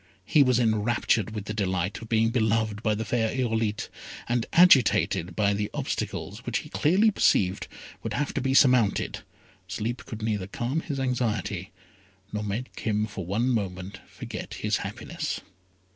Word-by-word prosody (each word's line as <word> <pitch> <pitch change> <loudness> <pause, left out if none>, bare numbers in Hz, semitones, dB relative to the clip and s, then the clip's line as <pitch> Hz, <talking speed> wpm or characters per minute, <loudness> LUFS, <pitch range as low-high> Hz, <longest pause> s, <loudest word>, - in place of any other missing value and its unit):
He 145 +8 +4
was 125 -3 +4
enraptured 110 -2 +1
with 105 -1 -4
the 110 - -4
delight 95 -2 -1
of 115 - -10
being 115 0 +3
beloved 110 -2 +1
by 110 -2 +1
the 110 +1 -3
fair 110 0 +1
Irolite, 115 -4 -1 0.4
and 120 -1 0
agitated 105 - +5
by 100 +1 +2
the 105 0 -2
obstacles - - -3
which - - -1
he - - -11
clearly 195 +8 +3
perceived 95 - +2 0.3
would - - -4
have 145 +2 -1
to 140 - -1
be 135 +1 +1
surmounted, 125 -7 +4 0.5
sleep 110 +6 -4
could 110 -1 -7
neither 105 -4 -1
calm 120 +9 -2
his 145 -5 -4
anxiety, 110 -7 -1 0.6
nor 105 - -1
make 105 +5 -4
him 105 -1 0
for 100 -5 -7
one 110 +6 0
moment 100 -3 -2
forget - - -7
his - - 0
happiness. - - -4
110 Hz, 160 wpm, -27 LUFS, 100-125 Hz, 0.6 s, agitated